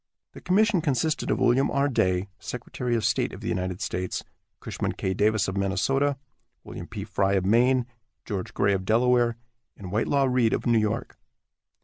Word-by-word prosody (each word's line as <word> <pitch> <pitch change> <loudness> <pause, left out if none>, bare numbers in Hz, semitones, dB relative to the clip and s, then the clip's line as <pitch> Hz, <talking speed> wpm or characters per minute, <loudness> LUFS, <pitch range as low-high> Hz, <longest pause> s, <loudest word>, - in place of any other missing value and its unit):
The - - -11
commission 200 0 +3
consisted 150 +1 0
of - - +1
William 130 +3 +3
R. 140 +1 +1
Day, 95 -7 +1
secretary 125 0 -4
of 115 - 0
state - - +1
of - - -9
the - - -5
United 95 +1 -2
States, 90 -3 -3 0.4
Cushman - - -3
K. 95 - -2
Davis 105 +2 +2
of 95 - -3
Minnesota, 135 +9 +1 0.5
William 85 - -8
P. 100 -3 -6
Frye 100 -2 0
of 95 -2 +1
Maine, 125 +4 +3 0.4
George 100 -5 -4
Gray 100 0 +2
of 95 -1 -1
Delaware, 120 +2 +2 0.4
and 95 -3 -8
Whitelaw 135 +7 +1
Reid 125 -4 +2
of - - -2
New 120 -2 +4
York. 110 +1 -2
115 Hz, 170 wpm, -26 LUFS, 100-130 Hz, 0.5 s, New